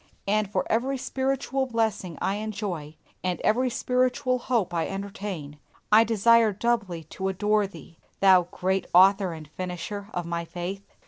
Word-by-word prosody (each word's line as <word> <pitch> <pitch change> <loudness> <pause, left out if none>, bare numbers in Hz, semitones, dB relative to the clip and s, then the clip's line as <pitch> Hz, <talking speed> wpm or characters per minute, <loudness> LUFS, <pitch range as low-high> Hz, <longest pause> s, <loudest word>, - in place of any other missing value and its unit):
And 210 0 +1
for - - 0
every 260 +4 0
spiritual 265 +1 -1
blessing 220 -8 -1
I 195 - 0
enjoy, 200 -8 -4 0.3
and 180 -1 -1
every 250 +4 +2
spiritual 255 +1 +1
hope 235 -8 0
I 165 -1 0
entertain, 195 -7 -6 0.3
I 215 +2 +8
desire 230 0 +4
doubly 200 -6 -1
to 190 - -3
adore 205 +2 +1
thee, 175 -4 -14 0.2
Thou 185 -3 +6
Great 190 0 -1
Author 190 0 +6
and 155 -2 -9
Finisher 185 +4 -5
of 175 -1 -2
my 170 0 -2
faith! 175 +3 -5
200 Hz, 145 wpm, -26 LUFS, 180-230 Hz, 0.3 s, I